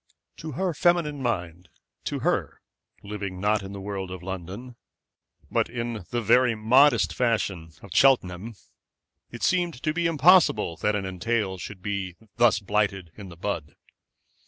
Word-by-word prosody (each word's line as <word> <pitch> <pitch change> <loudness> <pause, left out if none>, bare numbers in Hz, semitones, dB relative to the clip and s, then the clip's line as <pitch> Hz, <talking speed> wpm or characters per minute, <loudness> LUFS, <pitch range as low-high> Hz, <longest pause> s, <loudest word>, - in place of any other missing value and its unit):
To 155 -2 -7
her 185 +5 -1
feminine 160 -3 +1
mind, 90 -7 -3 0.4
to - - -3
her, - - -1 0.4
living, 100 -3 -5
not 105 +2 +1
in 95 0 -8
the 100 - -7
world 95 -1 -5
of 90 -1 -8
London, 95 +7 -7 0.8
but - - +1
in 115 -5 -4
the 120 -1 -2
very 120 +2 +4
moderate 120 +3 +4
fashion 100 -9 -1
of 100 - -12
Cheltenham, 110 -5 +3 0.7
it 120 - -9
seemed 175 -3 +1
to 155 -1 0
be 170 +1 +1
impossible 155 - +4
that 105 +3 0
an 100 -2 -2
entail 95 +1 -2
should 95 0 -8
be 100 -3 -3 0.2
thus 120 -2 +5
blighted 100 -4 -1
in 100 -3 -10
the 85 - -12
bud. 85 -6 -4
105 Hz, 150 wpm, -26 LUFS, 95-125 Hz, 0.8 s, thus